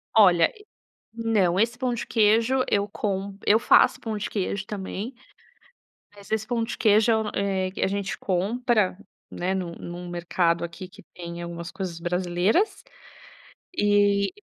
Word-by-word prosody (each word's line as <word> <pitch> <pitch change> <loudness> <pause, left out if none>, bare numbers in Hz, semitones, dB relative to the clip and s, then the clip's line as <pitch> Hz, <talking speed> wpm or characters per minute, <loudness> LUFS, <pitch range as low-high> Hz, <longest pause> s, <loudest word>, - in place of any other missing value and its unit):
Olha, 180 -6 +6
e 420 0 -17 0.5
não, 210 -6 +1
esse 235 +2 +1
pão 250 -1 -1
de 235 - -4
queijo 230 +4 +3
eu 200 0 +1
com 195 -1 -3
eu 220 +2 +5
faço - - +5
pão 220 -2 -4
de 205 - -4
queijo 200 0 -2
também. 205 +3 -5 1.0
Mas 200 +1 -15
esse 220 0 -1
pão 235 -2 0
de 225 - -5
queijo, 215 +1 +4 0.2
eh, 190 -2 0
a - - +3
gente 200 0 -3
compra, 205 +1 0 0.3
né, 185 +2 -2
num 175 -3 -3
num 175 +1 -8
mercado 170 0 0
aqui 170 +2 -7
que 205 +3 -16
tem 170 -1 -7
algumas 170 0 -6
coisas 175 -3 -5
brasileiras. 180 - 0 0.9
E 205 -3 +3
200 Hz, 145 wpm, -25 LUFS, 180-220 Hz, 1.0 s, Olha